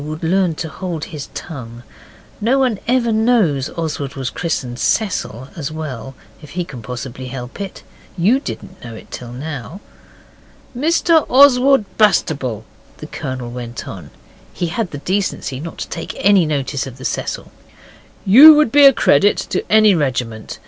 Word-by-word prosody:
would 155 +2 -6
learn 175 0 +1
to 160 - -4
hold 170 -2 -5
his 150 -3 -8
tongue. 120 -7 -8 0.6
No 250 +5 +3
one 250 -7 +1
ever 240 -1 +2
knows 215 - +2
Oswald 150 -4 -4
was 130 -2 -4
christened 130 -7 -3
Cecil 135 - -1
as 155 -2 -5
well, 135 -5 -6 0.3
if 150 - -12
he 175 - -1
can 130 -9 -9
possibly 125 +3 -7
help 125 +6 -7
it. 195 -2 -7 0.3
YOU 210 +10 +3
didn't 185 -8 -8
know 115 -2 -8
it - - -13
till 120 -1 -8
now. 145 +5 -7 1.0
'Mr 325 +3 +3
Oswald 270 -2 +5
Bastable,' 140 - +1 0.3
the - - -9
Colonel 130 -5 -6
went 120 -1 -7
on 85 -7 -9 0.4
he 175 - -3
had 185 +4 -2
the 145 - -7
decency 180 -5 -2
not 165 +3 -8
to - - -5
take 165 - -6
any 195 -4 +4
notice 140 -2 -2
of 130 -1 -10
the 130 - -9
'Cecil' - - -4 0.7
'you 280 +11 +10
would 300 -6 +3
be 290 +1 +7
a 275 - +9
credit 200 - +3
to - - -3
any 215 -1 +6
regiment. 125 -8 -2
160 Hz, 160 wpm, -18 LUFS, 130-210 Hz, 1.0 s, you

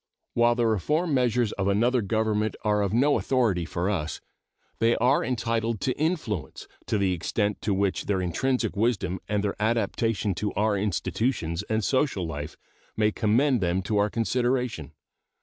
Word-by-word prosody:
While 120 0 +3
the 120 -1 +1
reform 150 - +1
measures 120 -3 +2
of 95 -1 -2
another 120 +5 +2
government 110 0 0
are 105 -1 +2
of 100 - 0
no 140 +6 +3
authority 110 -10 +1
for 85 +2 -2
us, 85 -6 -2 0.6
they 115 +1 +3
are 125 +4 +3
entitled 115 -2 -1
to 130 - 0
influence 140 - -2 0.2
to 110 - +1
the 95 -2 +1
extent 100 +4 -1
to 105 - -1
which 100 0 0
their 100 -2 +1
intrinsic 110 +6 -1
wisdom 100 -4 0
and 105 -1 0
their 100 - -1
adaptation 110 -1 0
to 105 +3 -2
our 105 0 +1
institutions 100 -3 -1
and 110 0 0
social 130 - +1
life 75 -1 -6 0.4
may 105 0 +3
commend 120 +4 +2
them 90 +1 0
to 105 +2 0
our 105 +1 +2
consideration. 120 - -1
110 Hz, 160 wpm, -26 LUFS, 100-120 Hz, 0.6 s, While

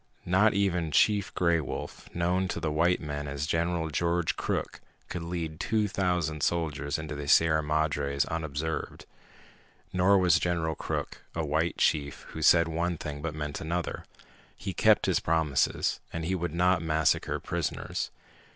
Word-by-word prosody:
Not 95 +4 +4
even 90 -5 +1
Chief 100 +5 +3
Gray 85 -2 +3
Wolf, 70 - -6
known 90 +2 +1
to 85 - -3
the 80 -2 -1
white 85 +4 +2
men 75 -1 -4
as 70 0 -3
General 85 0 0
George 85 +2 0
Crook, - - -3 0.3
could 90 - -4
lead 85 -2 -4
two 110 +1 +1
thousand 90 -6 -1
soldiers 75 -3 -1
into 80 -1 -5
the 75 0 -5
Sierra 80 +1 +5
Madres 75 -2 0
unobserved. 80 -1 -4 0.9
Nor 95 +2 +4
was 90 -2 +4
General 85 -2 0
Crook - - -4
a 80 -1 -1
white 80 +3 0
chief 75 -2 +1
who 80 - -7
said 85 +2 +6
one 85 +1 -1
thing 75 -1 -6
but 80 0 -4
meant 75 -1 -4
another. 85 +1 -3 0.5
He - - -5
kept - - +4
his - - +2
promises, 80 -4 +1
and 85 -1 -4
he 95 - 0
would 85 -3 -2
not 90 0 +3
massacre 80 -1 +1
prisoners. - - -3
80 Hz, 155 wpm, -28 LUFS, 75-90 Hz, 0.9 s, said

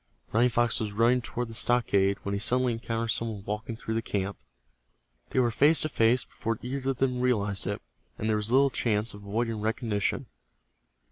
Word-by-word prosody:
Running 120 +3 +4
Fox 120 -1 +2
was 105 -2 -3
running 120 +4 +3
toward 120 0 -4
the - - -8
stockade 100 -5 +2
when 100 - -3
he 100 - -1
suddenly 125 +3 +2
encountered 115 0 -3
some 115 +1 -1
one 100 -2 -8
walking 105 +2 -4
through 110 0 -5
the 115 - 0
camp. 100 -2 -2 0.9
They - - 0
were 120 -2 +3
face 150 +7 +4
to 155 - -1
face 115 0 +2
before 115 -1 -3
either 135 +2 -3
of 135 - -1
them 125 -1 0
realized 105 -7 +1
it, 100 +1 -3 0.3
and 110 - -3
there 110 -1 +2
was 105 +2 -2
little 135 +1 +4
chance 110 -2 0
of 105 - -11
avoiding 110 +2 -2
recognition. 110 -2 -1
115 Hz, 195 wpm, -28 LUFS, 105-125 Hz, 0.9 s, Running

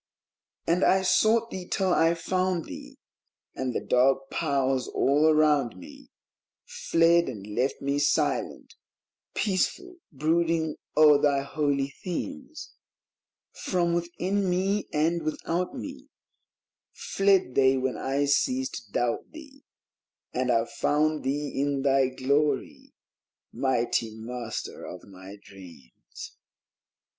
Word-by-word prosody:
And 175 +3 +1
I 190 0 +4
sought 225 +4 +3
thee 185 -1 -6
till 190 -2 0
I 165 +1 +3
found 185 0 -1
thee; - - -10 0.6
And 130 -1 -3
the - - -3
dark 135 +2 +2
Powers 135 -5 0
all 145 +3 +2
around 150 -8 +2
me 90 - -13 0.6
Fled 170 +1 +2
and 100 -2 -8
left 120 +7 -2
me 140 +1 0
silent, 145 - 0 0.6
peaceful, 355 - -1
brooding 160 +1 0 0.2
oer 150 -2 +7
thy 140 -2 +2
holy 140 -1 -1
themes; 275 - -6 0.8
From 175 -2 -1
within 180 +3 -1
me 195 +3 0
and 165 +3 +1
without 165 +3 -3
me 280 0 -8 0.8
Fled 195 -8 +1
they 135 0 +4
when 130 0 -1
I 140 +2 -1
ceased 255 - 0
to - - -28
doubt 120 -1 -1
thee; 290 -4 -13 0.7
And 130 0 -1
I 115 -1 +2
found 150 +4 0
thee 140 +1 -2
in 140 -1 -1
thy 135 -1 +3
Glory, 140 +3 -1 0.6
mighty 120 -4 0
Master 115 0 -6
of - - -9
my 95 +1 -12
dreams 85 -10 -13
150 Hz, 115 wpm, -27 LUFS, 130-180 Hz, 0.8 s, oer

